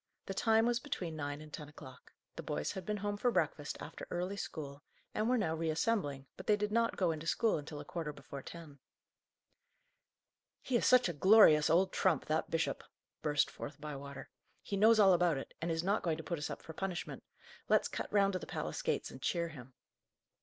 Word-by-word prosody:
The 195 - -4
time 225 +2 +3
was 240 0 +2
between 180 - -4
nine 145 -1 -4
and 155 -1 -12
ten 150 -2 -7
o'clock. 130 -4 -13 0.2
The - - -5
boys 75 0 -2
had 190 - -7
been 210 0 -1
home 205 0 -2
for 245 - +2
breakfast - - -1
after - - -8
early 180 +3 -2
school, 145 -7 -6 0.3
and 215 +2 0
were 255 - +3
now 195 -8 0
reassembling, 160 - -1
but - - -10
they 210 - +5
did 210 0 -2
not 230 +1 +1
go 180 -3 +2
into 160 +1 -5
school 220 -1 +2
until 150 0 -8
a 145 - -8
quarter 160 -2 -4
before 140 -1 -9
ten. 155 -2 -11 1.8
"He 255 - -1
is 235 - +3
such 255 -3 +6
a 175 - -2
glorious 160 -2 +7
old 185 +4 +3
trump, 175 -7 +2
that 155 +1 0
bishop!" 165 0 -1 0.4
burst 145 -2 +1
forth 145 - -8
Bywater. 140 -2 -7 0.3
"He 200 - -3
knows 220 +3 +6
all 195 -2 +7
about 175 -4 +3
it, 135 - -7
and 170 - -1
is 165 0 0
not 200 +3 +1
going 165 -3 0
to 160 - -7
put 170 -1 -3
us 150 - -3
up - - -7
for 160 - -9
punishment. 185 +1 -4 0.5
Let's - - +4
cut - - -5
round 200 -1 +3
to 185 - -1
the - - -9
palace - - -4
gates - - -1
and - - -11
cheer 170 -1 0
him." 130 -4 -12
170 Hz, 210 wpm, -34 LUFS, 150-205 Hz, 1.8 s, glorious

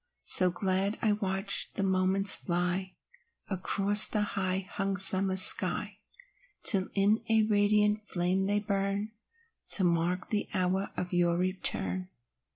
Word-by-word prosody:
So 185 -1 +6
glad 190 +3 -3
I 215 - +1
watch 195 -1 -2
the 200 - -4
moments 190 +1 +3
fly 180 +1 -5 0.6
Across 200 +2 +5
the 210 - -4
high 190 -2 -5
hung 195 0 -5
summer 190 0 +5
sky, 185 - +1 0.6
Till 195 -3 +3
in 205 +2 0
a 220 -1 +1
radiant 210 0 -2
flame 185 +2 -3
they 205 +1 -2
burn, 200 0 -5 0.6
To 195 - +3
mark 175 +1 -3
the 210 -1 -3
hour 185 +1 -3
of 180 0 -7
your 175 -1 -1
return. 95 - -3
195 Hz, 130 wpm, -26 LUFS, 185-205 Hz, 0.6 s, So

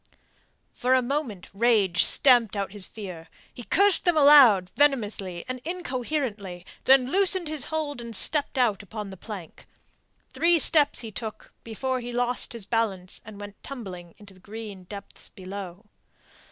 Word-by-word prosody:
For 255 +1 +1
a 260 - +3
moment 245 - -4
rage 200 -5 +2
stamped 240 -6 +4
out 200 -2 -3
his 205 -2 0
fear. 180 -6 -9 0.3
He 245 - -10
cursed 400 - +2
them 350 -3 +1
aloud 260 -11 +6
venomously 210 -11 0
and 255 -1 -6
incoherently, 255 - -4 0.2
then 265 -1 +4
loosed 375 -3 +3
his 305 -3 -1
hold 300 -5 -4
and 235 -1 -7
stepped 290 +5 +2
out 235 -6 +1
upon 205 0 -8
the - - -9
plank. 190 -5 -10 0.7
Three 335 +6 +3
steps 300 -1 +5
he 225 -2 -8
took 220 +1 -8
before 255 +3 -3
he 245 0 -7
lost 245 0 0
his 230 -4 -5
balance 200 -5 -2
and 210 -2 -12
went 205 -1 -11
tumbling 185 -10 -9
into 205 -2 -15
the 185 - -20
green 205 -2 -10
depths 200 +1 -9
below. 190 +1 -9
230 Hz, 155 wpm, -25 LUFS, 200-270 Hz, 0.7 s, aloud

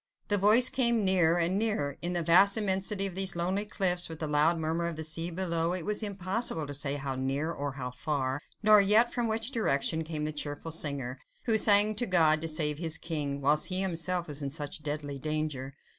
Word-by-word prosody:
The 205 - +3
voice 215 +6 +7
came 235 -5 +1
nearer 175 -3 +3
and 175 +3 +1
nearer; 205 -11 -1
in 175 +1 -3
the 175 -1 -1
vast 190 +5 +5
immensity 195 -1 0
of 195 - -4
these 190 -1 +1
lonely 185 +4 -1
cliffs, 180 -4 0
with 160 - -7
the 155 - -4
loud 150 +3 +2
murmur 165 +2 -2
of 170 - -4
the 160 - -5
sea 165 +2 -1
below, 170 -1 -1
it 180 -3 -4
was 210 +1 0
impossible 195 -4 -3
to 145 - -7
say 140 0 -1
how 135 -1 -4
near, 135 +5 -2
or 145 -3 -4
how 125 -2 -6
far, 135 +1 -3 0.2
nor 215 -1 +7
yet 215 +4 +3
from 240 -2 -1
which 225 +3 0
direction 160 - 0
came 155 -1 -4
that 155 -1 -5
cheerful 145 +2 -5
singer, 140 -5 -3 0.2
who 225 - +1
sang 210 0 +5
to 245 - -1
God 160 -4 +3
to 165 - -2
save 155 -2 -1
his 165 -2 0
King, 145 -4 -4
whilst 145 +2 +2
he 185 0 -1
himself 180 -1 -2
was 150 -1 -6
in 140 - -3
such 145 +1 -5
deadly 145 -1 -5
danger. 150 -3 -4
165 Hz, 215 wpm, -29 LUFS, 150-195 Hz, 0.2 s, voice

